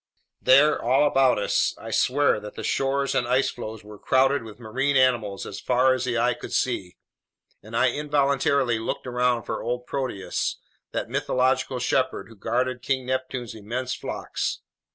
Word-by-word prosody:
There, 140 +4 +5
all 130 +5 +3
about 135 -3 +4
us, 105 - +1
I - - -8
swear 140 -3 +2
that 105 0 -9
the - - -6
shores 135 +1 0
and 130 -3 +1
ice 130 +2 +2
floes 110 -3 -7
were 105 -1 -12
crowded 135 +2 +3
with 110 -1 -11
marine 130 +5 -1
mammals 120 -7 +2
as 100 - -7
far 130 +1 +3
as 130 -1 -2
the 120 -2 -1
eye 125 +2 +2
could - - -9
see, 100 -8 -1 0.6
and - - -6
I - - +4
involuntarily 140 -4 +1
looked 110 - -4
around 125 -1 +1
for - - -4
old 125 +1 -3
Proteus, 125 -10 -2 0.3
that - - -3
mythological 130 0 0
shepherd 130 0 0
who 115 - -14
guarded 125 +4 -1
King 130 -1 -1
Neptune's 130 -2 -3
immense 120 +4 -4
flocks. - - -4
125 Hz, 165 wpm, -25 LUFS, 115-135 Hz, 0.6 s, There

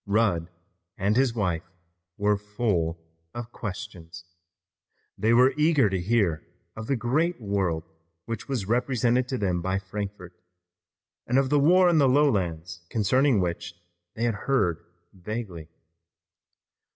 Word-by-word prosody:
Rudd 100 -5 +1 0.5
and 100 +3 +1
his 130 -2 +2
wife 90 -5 -1 0.5
were 105 0 +2
full 100 -5 -1 0.4
of 120 -1 -6
questions. 90 -6 -7 0.9
They 110 - +1
were 125 +3 +5
eager 150 -8 +3
to 95 -2 -1
hear 95 -6 +1 0.3
of 110 0 -7
the 135 - +1
great 145 +9 0
world 95 -7 -1 0.4
which 115 -1 -5
was 125 -8 -1
represented 125 +2 +1
to 130 0 -2
them 90 -5 0
by 95 +2 -1
Frankfort, 100 -2 -6 0.9
and 125 - +2
of 135 0 +2
the 145 - +4
war 180 +5 +5
in 170 -3 +4
the 135 -2 +5
lowlands 90 - +1
concerning 125 +3 +2
which 90 0 -3 0.4
they 115 - -3
had 120 -1 +2 0.2
heard 90 - +1 0.3
vaguely. 95 -4 -6
105 Hz, 130 wpm, -26 LUFS, 90-125 Hz, 0.9 s, were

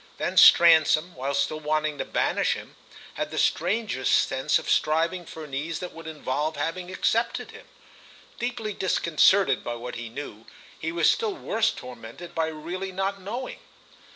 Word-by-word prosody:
Then - - -2
Stransom, 165 0 +6
while 135 +2 -3
still 140 +2 0
wanting 155 -1 -1
to - - -2
banish - - +1
him, - - -9 0.4
had - - -3
the - - -7
strangest 180 - +1
sense 130 0 +1
of - - -7
striving 165 +3 +1
for 160 - -8
an 145 -3 -11
ease 155 +4 -3
that 180 - -6
would 165 -1 -10
involve 150 0 -2
having 180 +2 -3
accepted 225 +5 0
him. - - -14 0.7
Deeply 235 -3 -3
disconcerted 185 -3 +3
by 120 - -4
what 120 +1 -7
he 115 -1 -6
knew, 115 -3 -8 0.3
he 160 - -3
was 170 -1 +2
still 435 -4 -1
worse 225 -8 0
tormented 125 - -9
by 160 -1 0
really 170 +5 -5
not 195 +1 -2
knowing. 235 +7 -5
160 Hz, 160 wpm, -26 LUFS, 145-190 Hz, 0.7 s, Stransom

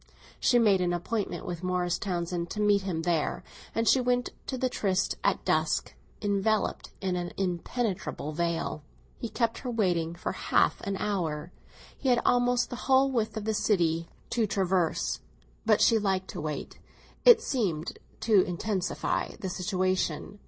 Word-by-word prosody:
She 245 - +4
made 205 -5 +4
an 175 -1 +1
appointment 200 +4 -2
with 175 -1 -4
Morris 180 -1 0
Townsend 175 -2 -2
to 210 - -5
meet 205 -1 +4
him 175 -4 -3
there, 170 -3 0 0.3
and 225 0 +1
she 260 - +5
went 245 0 +1 0.2
to 260 - -2
the 255 +1 +1
tryst 190 -6 0
at - - +1
dusk, - - +1 0.3
enveloped 205 +1 0
in 185 -2 0
an 175 -1 -3
impenetrable 190 - -2
veil. 165 -1 -2 0.4
He 235 - -4
kept 230 +1 0
her 255 - -5
waiting 175 -8 0
for 175 - -3
half - - +1
an 195 -1 -1
hour—he 180 - -4
had 245 -1 +4
almost 245 0 +3
the 245 - -4
whole 265 +1 +5
width 225 -4 -1
of 210 - -4
the 220 - +1
city 170 -6 +1 0.2
to 230 -3 +1
traverse—but 165 - -1
she 225 - +5
liked 190 -2 0
to - - -5
wait, 150 -1 -5 0.4
it 480 -2 +9
seemed 200 - -2 0.2
to 215 -4 +5
intensify 185 +2 -2
the 190 - -3
situation. 185 0 -1
190 Hz, 150 wpm, -28 LUFS, 175-225 Hz, 0.4 s, it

